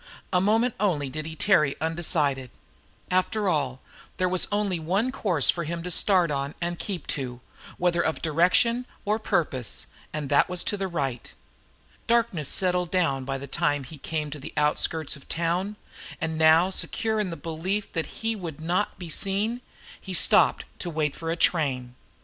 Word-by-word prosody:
A 180 - +4
moment 225 +5 +3
only 155 -10 0
did 155 +2 -4
he 160 - -7
tarry 155 -6 +3
undecided; 155 -5 0 0.6
after 195 +3 +1
all, 135 -7 0 0.4
there 185 - +2
was 185 0 +1
only 205 -4 0
one 195 +10 0
course 180 - +3
for 170 - -4
him 170 +2 -4
to 180 - -4
start 180 -2 +4
on 140 +1 -2
and 175 0 -3
keep 185 -7 -4
to, 125 -3 -3 0.4
whether 175 -1 +2
of 160 - -1
direction 185 +10 +2 0.2
or 210 +2 +1
purpose, 130 - -1 0.3
and 150 -2 -3
that 145 - +4
was 180 -1 0
to - - 0
the 195 -1 -2
right. 135 -9 -3 0.8
Darkness 230 - +2
had - - +1
settled 180 -1 +1
down 160 -8 +1
by 135 0 -2
the 135 - -7
time 145 -1 0
he 145 +3 -11
came 150 +1 -3
to 150 - -6
the 150 +4 -9
outskirts 150 +1 +1
of 140 - -15
the - - -2
town, 175 +5 0 0.4
and 160 0 -2
now 160 +3 +5
secure 220 +3 -1
in 205 -3 0
the 165 - -5
belief 170 +7 -3
that 165 -3 -1
he 225 +7 -3
would 170 -7 -6
not 175 +6 -1
be 175 -4 -7
seen, 210 +7 0 0.4
he 190 -2 -3
stopped - - +5
to 175 - -3
wait 155 -3 -1
for 165 - -5
a 165 - +1
train. 135 -8 +1
170 Hz, 180 wpm, -26 LUFS, 150-190 Hz, 0.8 s, now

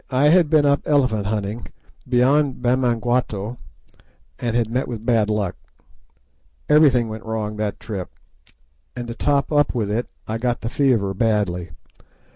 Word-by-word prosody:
I 140 +3 +3
had 170 -2 +4
been 155 -2 +4
up 140 0 +3
elephant 125 -9 +2
hunting 105 +2 -3 0.4
beyond 135 +3 +2
Bamangwato, 120 -3 0 0.8
and 120 -1 -2
had 120 -2 +1
met 125 +4 -2
with 115 -2 -6
bad 115 -3 +2
luck. 105 -4 -1 1.1
Everything 140 -6 +4
went 110 0 -7
wrong 110 -1 -3
that 105 -1 -3
trip, 100 -5 -6 0.9
and 120 -1 -5
to 115 - -5
top 140 +3 0
up 145 -3 +2
with 110 +1 -1 0.2
I 110 +1 -3
got 120 0 -1
the 115 - -3
fever 115 -8 +1
badly. 95 -5 0
120 Hz, 140 wpm, -21 LUFS, 105-130 Hz, 1.1 s, had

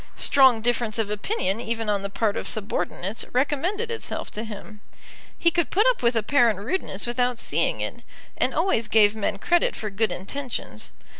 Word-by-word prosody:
Strong 265 -5 +5
difference 235 -1 0
of 215 -2 -1
opinion 210 - -1
even 225 -1 -3
on 205 -1 +1
the 200 - -4
part 205 +1 0
of - - -3
subordinates 200 0 -2
recommended 335 - 0
itself 460 - -4
to 215 - -5
him. 210 -1 -9 0.6
He 340 - +3
could 340 0 0
put 420 +5 +3
up - - +3
with 235 0 +2
apparent 230 0 +3
rudeness 205 - -3
without 245 0 0
seeing - - 0
it, - - -4 0.3
and - - +1
always 230 - +1
gave 210 -1 +5
men 205 -1 -1
credit 345 - +2
for 215 -2 -5
good 210 0 0
intentions. 210 - -5
225 Hz, 170 wpm, -24 LUFS, 210-275 Hz, 0.6 s, Strong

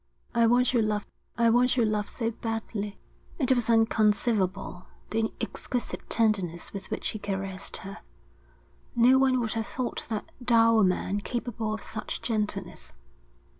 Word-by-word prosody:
'I 235 -1 +4
want 250 +2 +4
your 240 - +4
love. 210 -1 0 0.3
I 235 -1 +4
want 250 +2 +3
your 235 - +4
love 210 -1 -1
so 230 -2 -2
badly.' 220 -2 -4 0.4
It 265 -5 +1
was 245 -3 +2
inconceivable, 210 -4 +2 0.2
the 220 0 0
exquisite 245 -2 -4
tenderness 195 -7 +1
with 195 - -5
which - - -2
he 215 - -4
caressed 195 -1 -4
her. 195 +1 -8 1.0
No 250 +3 +6
one 260 -1 +3
would 225 -2 -2
have 225 -2 -2
thought 255 -1 -3
that 215 -2 -4
dour 230 -2 +5
man 185 +2 +1
capable 230 -1 -3
of 215 - -4
such 215 +1 -5
gentleness. 210 -5 -2
225 Hz, 145 wpm, -28 LUFS, 205-235 Hz, 1.0 s, No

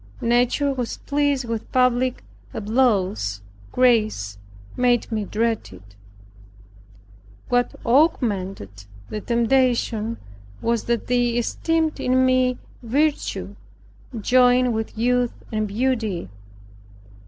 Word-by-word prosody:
Nature 245 +4 +2
was 250 -3 -4
pleased 285 -2 0
with 230 -1 -5
public 255 0 +1 0.3
applause; 200 - +1 0.3
grace 215 - +1 0.4
made 245 -1 +1
me 215 -2 -1
dread 225 +2 -1
it. 100 +1 -15 1.5
What 245 -1 +1
augmented 195 - 0 0.3
the 215 - -4
temptation 235 -2 +1 0.4
was 235 -1 -1
that 235 -1 -1
they 245 -1 +1
esteemed 320 +6 0
in 260 +1 +2
me 255 -1 +2 0.2
virtue, 285 +6 -1 0.6
joined 250 +2 +4
with 220 0 -4
youth 245 +1 +1 0.2
and 215 -1 -1
beauty. 220 - -1
240 Hz, 95 wpm, -22 LUFS, 215-255 Hz, 1.5 s, joined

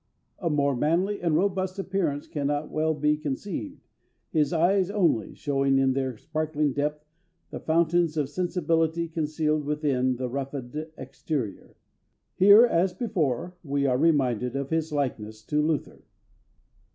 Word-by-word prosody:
A 175 - -1
more 140 -2 +1
manly 175 +10 0
and 165 -3 +1
robust 190 +1 0
appearance 185 -7 -1
cannot 145 0 -2
well 155 0 0
be 150 +1 +2
conceived, 195 - -5 0.5
his 155 -1 +2
eyes 180 +3 +2
only 175 - +1
showing 135 -1 +1
in 135 -1 +3
their 130 -3 -2
sparkling 155 0 -1
depth 150 +2 -2 0.5
the - - -5
fountains 165 0 +1
of 145 -3 +1
sensibility 165 0 0
concealed 155 -1 -1
within 140 -4 0
the 125 +1 -3
roughened 135 +3 -5
exterior. 130 -3 -5 0.6
Here, 205 +5 +8
as 180 -4 +1
before, 175 - -1
we 140 -2 -1
are 125 -1 +2
reminded 125 -6 +2
of 140 +1 -3
his 160 0 0
likeness 110 -7 -3
to 150 +5 +1
Luther." 155 0 -2
150 Hz, 135 wpm, -26 LUFS, 140-170 Hz, 0.6 s, Here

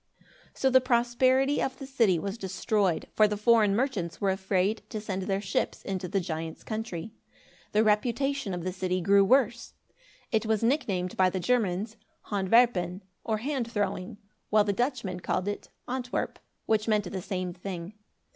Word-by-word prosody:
So 265 - +2
the 260 0 +6
prosperity 255 +3 +2
of 260 0 -2
the 270 - -7
city 230 -9 +2
was 195 +4 -3
destroyed, 190 -2 0
for 215 - +5
the 210 0 -2
foreign 210 -2 +4
merchants 215 -9 -1
were 195 -1 +2
afraid 190 +2 0
to 220 - -4
send 195 -3 -4
their 195 +1 -1
ships 200 - -2
into 190 -2 -3
the 195 +2 0
giant's 160 -2 -5
country. 215 -4 -5 0.6
The 215 +1 +3
reputation 235 +1 +1
of 175 - -5
the 185 0 -2
city 185 0 -1
grew 200 +2 +5
worse. 240 +1 +2 0.6
It 220 0 +1
was 220 0 +1
nicknamed 200 -9 0
by 185 -1 +5
the 185 +1 -3
Germans 215 0 0 0.3
Hand 195 -2 -1
Werpen, 195 -6 +3 0.2
or 220 -1 0
Hand 250 0 -2
Throwing; 200 -3 -2 0.3
while 210 0 +5
the 205 -1 0
Dutchmen 240 -6 -2
called 185 +2 -1
it 205 - -4 0.2
Antwerp, 250 0 -3 0.3
which 215 0 +1
meant 210 -4 +1
the 190 - -4
same 185 -2 -3
thing. 180 0 -6
210 Hz, 165 wpm, -28 LUFS, 185-235 Hz, 0.6 s, the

